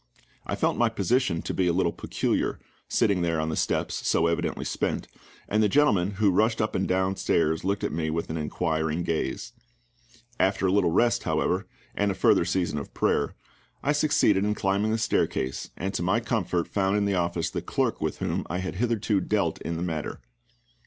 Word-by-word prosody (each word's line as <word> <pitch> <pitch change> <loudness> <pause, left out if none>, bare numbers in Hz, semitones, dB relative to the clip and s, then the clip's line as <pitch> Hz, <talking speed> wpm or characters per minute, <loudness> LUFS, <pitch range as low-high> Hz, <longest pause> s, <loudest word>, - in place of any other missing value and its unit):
I - - -1
felt - - 0
my 120 -1 +4
position 110 -4 0
to - - -3
be 95 - +1
a 85 - +2
little 95 - +2
peculiar - - -1 0.3
sitting 100 -6 +2
there 85 -2 0
on 80 +1 -1
the 80 - -2
steps, - - -1
so 80 - +3
evidently 85 0 -1
spent - - -2 0.4
and 105 +1 +2
the 105 - +3
gentlemen 100 -8 +3
who 100 0 +3
rushed 110 +5 +2
up 110 - 0
and 95 - 0
downstairs 95 -4 +1
looked 100 +2 -1
at - - 0
me 80 +1 -1
with 80 +1 -2
an - - -3
inquiring 80 +1 -1
gaze. 85 -2 -2 0.9
After 95 0 +2
a 95 - +3
little 95 -3 +3
rest, 115 +6 +2
however, - - 0 0.3
and 100 0 +1
a 95 - -1
further 85 - +4
season 85 -4 0
of 70 - -9
prayer, - - +1 0.5
I 145 - +2
succeeded 145 -10 +3
in 105 +1 +1
climbing 100 +2 +1
the 110 - +1
staircase, 65 - -1
and 95 +3 -3
to - - -2
my 95 +6 +2
comfort 100 -7 -1
found 95 0 +1
in 105 - +1
the 100 - +1
office 85 -2 -1
the - - -3
clerk - - -1
with - - -2
whom - - -2
I 90 - -2
had 95 0 -4
hitherto 110 -3 +1
dealt 100 -7 0
in 85 0 -3
the 85 - -3
matter. 80 -4 -3
95 Hz, 195 wpm, -26 LUFS, 85-105 Hz, 0.9 s, my